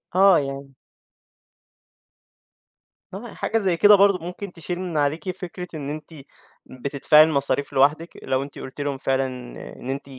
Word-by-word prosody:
آه 190 -1 +6
يعني 135 -1 -6 2.4
آه، 195 - -5
يعني 240 - -10
حاجة 225 - -1
زي 190 -6 +1
كده 205 +4 +7
برضه 200 -1 +4
ممكن 180 +2 -7
تشيل 175 +1 -6
من 180 -4 -4
عليكِ 150 +5 0
فكرة 180 -1 -8
إن 145 -2 -5
أنتِ 155 +2 -7 0.5
بتدفَعي 140 +4 +3
المصاريف 140 -2 -1
لوحدِك، 150 +5 +2
لو 130 0 0
أنتِ 140 - -10
قلتِ 130 +2 -8
لهُم 145 -1 -2
فعلًا 135 0 0 0.5
إن 125 - -8
أنتِ 135 +1 -5
155 Hz, 145 wpm, -23 LUFS, 140-180 Hz, 2.4 s, كده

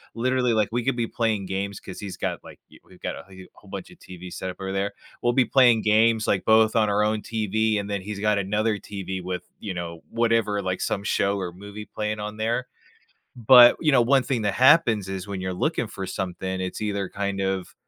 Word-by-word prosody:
literally, 125 0 +1
like, 110 -2 +2
we 120 +1 -1
could 135 +1 0
be 115 -1 0
playing 110 -4 -1
games 100 +1 -4
'cause 95 - -10
he's 100 -3 -7
got, - - -3
like - - -13
w - - -18
we've - - -19
got - - -4
a - - -10
wh 95 -1 -13
uh - - -14
whole - - -19
bunch - - -7
of - - -17
TV 90 0 -10
set 95 - -5
up 90 - -8
over 95 0 -4
there. 100 +1 -1 0.3
We'll 120 - +2
be 130 0 +4
playing 120 -4 +4
games, 110 +1 +3
like, 95 - +1
both 110 0 +4
on 110 -2 +3
our 105 +1 +2
own 110 0 0
TV, 110 0 0
and 100 0 -5
then 100 -2 -2
he's 100 +1 -6
got 105 0 +2
another 105 +2 0
TV 95 -2 -6
with, 90 0 -4 0.2
you 100 - -4
know, 85 -1 -6
whatever, 115 -3 +1
like, 95 0 -2
some 100 - -1
show 100 -1 +1
or 90 -2 -4
movie 100 +3 -9
playing 105 0 -4
on 105 0 -5
there. 115 +3 -1 0.7
But, 120 +1 +8
you 155 -2 +3
know, 130 -3 +5
one 135 +2 +3
thing 125 -2 -2
that 105 -2 0
happens 125 - +4
is 95 0 -5
when 100 -2 -5
you're 95 0 -3
looking 120 - -1
for 95 -2 -6
something, 95 0 -4
it's 95 0 -4
either 100 -2 -2
kind 100 0 -3
of 95 -1 -2
105 Hz, 235 wpm, -24 LUFS, 95-115 Hz, 0.7 s, But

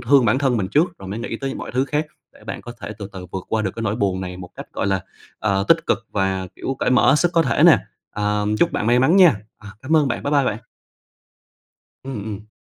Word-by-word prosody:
thương 140 -3 +4
bản 115 +4 +3
thân 135 -4 +1
mình 95 -3 -1
trước 165 +3 +1
rồi 95 - -9
mới 105 +4 -4
nghĩ 115 -1 -4
tới 135 +1 -4
mọi - - -6
thứ 130 +2 +1
khác 150 +3 -1 0.3
để - - -19
bạn - - -5
có 120 - -8
thể 105 - -6
từ 100 -1 -6
từ 90 -1 -8
vượt 95 -1 -4
qua 110 -1 0
được 95 - -1
cái 115 - -4
nỗi 110 +1 -1
buồn 95 -4 0
này 90 -1 -5
một 90 -1 -9
cách, - - -8
gọi - - -2
là, 95 -1 +1 0.4
ờ, 100 -2 0
tích - - +4
cực - - +2
và, 95 -1 0
kiểu, 135 - -3
cởi - - 0
mở 125 +1 +5
hết 145 - +5
sức 175 +2 +1
có 165 -1 +4
thể 115 -5 +1
nè. - - +8 0.3
Ờ, 105 0 -1
chúc - - +2
bạn 105 - -1
may 120 +1 +4
mắn 155 +9 +4
nha! 180 - +7 0.2
À, 100 - -12
cảm 160 +4 +2
ơn 145 -3 +3
bạn, 120 - -3
bye 145 - -2
bye 140 -2 +4
bạn. 110 -3 -1 1.4
Ừm, 130 -6 -5
ừm. 105 0 -7
115 Hz, 265 wpm, -21 LUFS, 100-135 Hz, 1.4 s, nè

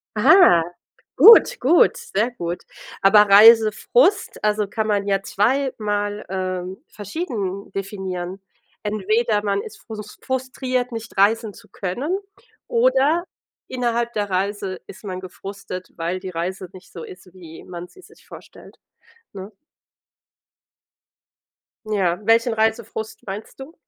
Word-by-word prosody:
Ah, 355 - +6 0.5
gut, 455 +1 +7
gut, 315 +8 +4
sehr 220 +5 -2
gut. 175 -6 -5 0.4
Aber 210 +2 +6
Reisefrust 225 - +5
also 210 -1 +1
kann 220 +1 -3
man 200 -1 0
ja 195 -1 +1
zweimal 210 -3 -1
ähm, 185 0 -4
verschieden 205 - -5
definieren. 190 -2 -5 0.4
Entweder 215 +1 0
man 200 -1 0
ist 215 - -11
frus 210 -2 -10
frustriert, 255 -1 -3
nicht 230 -3 -8
reisen 215 +1 +2
zu 215 - -17
können 255 - -3 0.5
oder 345 - +2 0.4
innerhalb 235 -1 -2
der 205 -1 -2
Reise 195 0 -2
ist - - -13
man 185 -3 -5
gefrustet, 185 0 -9
weil 170 +3 -3
die 190 - -6
Reise 180 +2 -5
nicht 185 0 -15
so 165 - -8
ist, 185 -1 -13
wie 165 -3 -13
man 175 -1 -8
sie - - -18
sich - - -20
vorstellt, - - -14 0.6
ne? 195 0 -9 2.4
Ja, 190 -5 0
welchen 230 +2 +3
Reisefrust 220 0 -2
meinst 205 +6 -8
du? 280 +5 -10
205 Hz, 120 wpm, -21 LUFS, 190-235 Hz, 2.4 s, gut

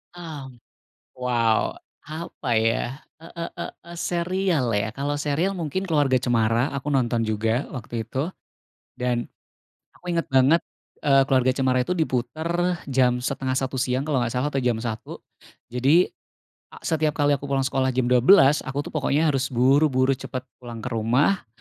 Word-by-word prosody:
Mmm, 145 -8 -9 0.6
wow! 120 -3 +1 0.3
Apa, 155 -6 -3
ya? 115 +5 0 0.2
E 165 - -12
e 170 - -4 0.2
e - - -2 0.3
e - - -7
serial, 175 -7 0
ya? 105 0 0
Kalau 145 +1 -2
serial 150 +6 0
mungkin 185 0 -3
Keluarga 145 -7 +2
Cemara, 120 0 +1
aku 140 +1 -5
nonton 120 -3 +1
juga 110 +4 0
waktu 115 -2 -5
itu, 140 +9 -2 0.7
dan 120 -1 -1 0.6
aku 180 - -20
inget 165 -3 0
banget, 135 +5 +4 0.4
eee, 135 -1 +5
Keluarga 130 -2 +3
Cemara 130 -1 +1
itu 180 +6 -2
diputer 160 +6 -1
jam 125 -2 +2
12.30 130 +1 -2
siang 130 +2 -1
kalau 135 -5 +1
nggak 115 - -2
salah, 145 +4 0
atau 135 - 0
jam 120 -2 +1
1. 115 -1 -5 0.5
Jadi, 135 +9 +3 0.7
a - - -14
setiap 155 -2 0
kali 145 -1 +2
aku 140 0 -1
pulang 135 -1 +1
sekolah 130 -1 0
jam 125 -1 +1
12, 135 +3 +6
aku 140 +2 -2
tuh - - -8
pokoknya 155 +1 +1
harus 135 0 0
buru-buru 130 +1 +3
cepet 130 -1 -6 0.2
pulang 120 -3 -8
ke 125 - -4
rumah, 120 - +1
135 Hz, 155 wpm, -24 LUFS, 125-150 Hz, 0.7 s, 12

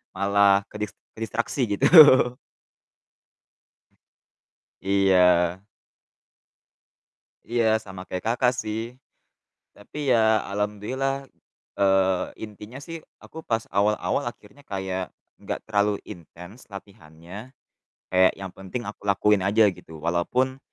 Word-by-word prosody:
malah 100 0 +3
kedis 105 0 -5 0.2
kedistraksi 115 +4 -3
gitu. - - +2 2.9
Iya. 95 -1 +2 1.8
Iya, 115 -2 +1
sama 95 -4 -10
kayak, 90 - -5
Kakak, 125 0 +1
sih. 110 +3 -5 0.8
Tapi 140 +6 -5
ya 110 -2 +3
alhamdulillah, 125 +7 -3 0.5
eee, 95 -1 +2 0.2
intinya 105 +4 -11
sih 165 +1 -7 0.2
aku 160 0 -11
pas 115 -1 0
awal-awal 105 +6 0
akhirnya 120 +4 -10
kayak 95 -2 -4 0.2
enggak - - -6
terlalu 105 -1 0
intens 90 +6 -12
latihannya, 95 +3 -12 0.6
kayak 95 0 +4
yang 95 -1 -8
penting 95 +6 -6
aku 105 - -10
lakuin 100 0 +2
aja 105 +3 +4
gitu 80 -2 -13
walaupun 125 - -1
105 Hz, 95 wpm, -24 LUFS, 95-115 Hz, 2.9 s, kayak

